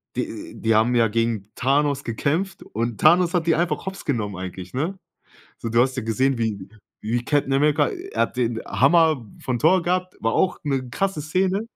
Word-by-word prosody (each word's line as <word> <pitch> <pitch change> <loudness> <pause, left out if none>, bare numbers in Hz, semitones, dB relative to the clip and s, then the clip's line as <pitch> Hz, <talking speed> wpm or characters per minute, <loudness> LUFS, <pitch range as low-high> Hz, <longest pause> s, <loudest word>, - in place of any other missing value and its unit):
Die - - -5
die 115 0 +2
haben 115 +3 +3
ja 115 -1 +4
gegen 115 -2 -1
Thanos 140 +1 +1
gekämpft 155 - -2
und 115 0 -4
Thanos 175 +3 +5
hat 175 -2 +1
die 165 - +4
einfach 175 +3 -1
hops 190 0 -6
genommen 105 -8 -2
eigentlich, 95 0 -7
ne? 165 +9 -2 0.6
So, 115 - -4
du 115 +1 +4
hast 130 +1 0
ja - - 0
gesehen 130 +4 +1
wie 105 -4 -2 0.4
wie 120 +3 -1
Captain 145 -2 +1
America 145 +1 +3
er 390 +3 -4
hat - - -1
den 120 -2 0
Hammer 155 -2 +3 0.2
von 125 -2 -1
Thor 180 +3 +4
gehabt, 180 +1 -1
war 115 0 0
auch 185 - +1
'ne 135 -4 -1
krasse 195 -1 -1
Szene. 185 +6 0
135 Hz, 190 wpm, -23 LUFS, 115-170 Hz, 0.6 s, Thanos